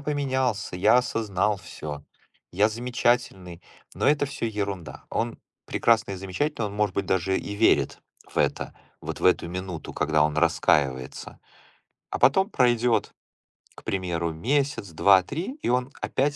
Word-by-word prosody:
поменялся, 130 -9 -1
я 105 +6 +5
осознал 105 -4 0
всё, 75 -6 -8 0.5
я 100 +4 +3
замечательный". 120 -6 -1 0.3
Но - - -1
это 145 0 +3
всё 135 -4 -4
ерунда. 100 -5 -4
Он 115 0 -2 0.3
прекрасный 115 -3 +2
и - - -6
замечательный, 105 +7 -2
он, 100 - -7
может 105 -2 0
быть, 100 -1 -1
даже 95 +1 +1
и 100 - -6
верит 110 +2 +2 0.3
в - - -2
это - - 0 0.3
вот - - -6
в - - -4
эту 90 -2 +3
минуту, 90 -2 -6
когда 75 0 +2
он 75 0 +1
раскаивается, 75 -5 +1 0.7
а - - -3
потом 190 +9 +4
пройдёт, 120 - +2 0.6
к - - -14
примеру, 85 -3 -2
месяц, 135 - -1
2, 95 +3 +5
3, 175 - -5
и - - 0
он 125 +2 +1
опять 145 +2 0
105 Hz, 145 wpm, -25 LUFS, 90-125 Hz, 0.7 s, я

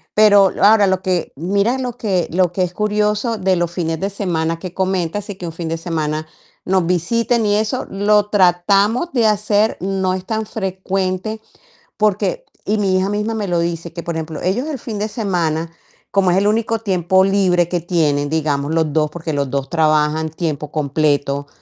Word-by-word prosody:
pero 205 -2 +6
ahora, 205 0 +6
lo 190 -1 +1
que 180 -3 -1
mira 200 - 0
lo 250 -2 -4
que 190 -7 0
lo 180 0 +2
que 185 +1 0
es 180 - -3
curioso 210 +2 0
de 190 -1 +1
los 175 -1 0
fines 165 -2 -2
de 195 - -1
semana 165 -5 -2
que 180 0 -7
comentas, 190 +1 -1
sí 205 -2 -7
que 180 - -8
un 165 - -5
fin 165 -1 -5
de 165 - -2
semana 155 -2 -3 0.4
nos 185 -2 +2
visiten 225 +7 +1
y 205 0 +2
eso, 220 +4 -1
lo 205 +1 +2
tratamos 200 - +2
de 235 -4 +3
hacer, 210 0 +1
no 190 -1 0
es 185 0 -6
tan 220 +1 -2
frecuente, 190 +1 -3 0.6
porque 215 - 0 0.2
y 215 - +1
mi 195 -2 +2
hija 190 +1 0
misma 210 +2 -1
me 210 -4 -3
lo 175 - +1
dice, 170 0 -3
que, 170 - -5
por 170 0 -4
ejemplo, 160 -1 -5
ellos 200 +9 0
el 285 -4 -4
fin 225 -2 -6
de 210 - -1
semana, 170 -7 -1 0.4
como 190 -2 +3
es 180 - +2
el 200 +1 +2
único 225 +1 +1
tiempo 190 -3 +2
libre 185 -3 +2
que 175 - 0
tienen, 150 -5 0
digamos, 150 -1 -1
los 160 -2 +1
2, 155 -1 +2
porque 165 -1 -5
los 140 -2 -1
2 140 -1 -2
trabajan 155 -1 +2
tiempo 155 -2 -4
completo. 145 -1 0
185 Hz, 190 wpm, -18 LUFS, 165-210 Hz, 0.6 s, pero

